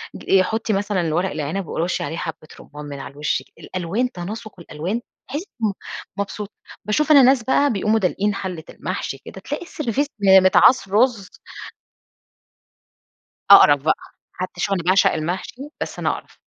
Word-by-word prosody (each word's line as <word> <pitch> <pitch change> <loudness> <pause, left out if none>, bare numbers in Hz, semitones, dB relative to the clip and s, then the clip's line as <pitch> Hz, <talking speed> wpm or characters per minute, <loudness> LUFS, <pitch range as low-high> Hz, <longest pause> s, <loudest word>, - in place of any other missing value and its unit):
ج 195 - +3
حطِّي 220 +3 -1
مثلًا 200 -1 0
الورق 170 +3 0
العنب 155 +5 -3
ورُشِّي 175 +1 -2
عليه 165 - -4
حبة 160 -2 -6
رمان 150 0 -10
من 140 -1 -7
على - - -8
الوش 145 +1 -1
كده، - - -31
الألوان 190 +8 -2
تناسق 205 +1 -7
الألوان 170 +8 -4 0.3
تحسِّي 295 +8 -4 0.2
إم 215 - +3
م - - -3 0.4
مبسوطة. 200 +1 -5 0.3
باشوف 300 +10 +1
أنا 285 -2 +9
ناس 255 -1 +4
بقى 280 +2 +2
بيقوموا 215 +2 +1
دالقين 200 +2 0
حلّة 180 -5 -5
المحشي - - -5
كده، - - -10
تلاقي - - -5
السرفيس 285 -3 -2 0.3
متعاص 190 +5 +5
رز. 220 -2 +2 2.2
أقرَف 145 -2 +8
بقى، 155 - +2 0.4
حتى 185 +1 -6
شوفي 200 - +1
أنا 180 - -2
باعشق 185 +3 +4
المحشي، 180 - -4 0.2
بس - - -5
أنا - - 0
أقرف. - - -7
195 Hz, 155 wpm, -21 LUFS, 170-225 Hz, 2.2 s, أنا